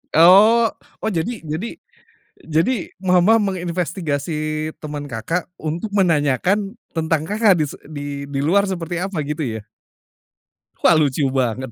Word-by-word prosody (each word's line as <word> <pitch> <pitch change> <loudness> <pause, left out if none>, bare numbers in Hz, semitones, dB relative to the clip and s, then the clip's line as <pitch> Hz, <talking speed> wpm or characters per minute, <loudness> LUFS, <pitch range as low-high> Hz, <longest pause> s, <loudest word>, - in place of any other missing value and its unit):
Oh. 210 +8 +7 0.3
Oh, - - +1
jadi 200 +5 -3
jadi 160 - -4 0.7
jadi 160 +10 +1 0.3
mama 185 +4 +4
menginvestigasi 165 -5 -2
teman 150 -1 -5
Kakak, 165 +11 -3
untuk 165 +7 -3
menanyakan 185 - +1 0.2
tentang 160 -1 +1
Kakak, 210 -3 +3
dise 150 -3 -2
di 145 -1 -5
di 135 -1 -2
luar 195 +7 +3
seperti 175 -2 -4
apa 190 -2 -3
gitu 150 +2 -3 0.2
ya? - - -9 1.2
Wah 175 -3 +6
lucu 145 -1 +1
banget. 130 0 -1
165 Hz, 125 wpm, -20 LUFS, 150-195 Hz, 1.2 s, Oh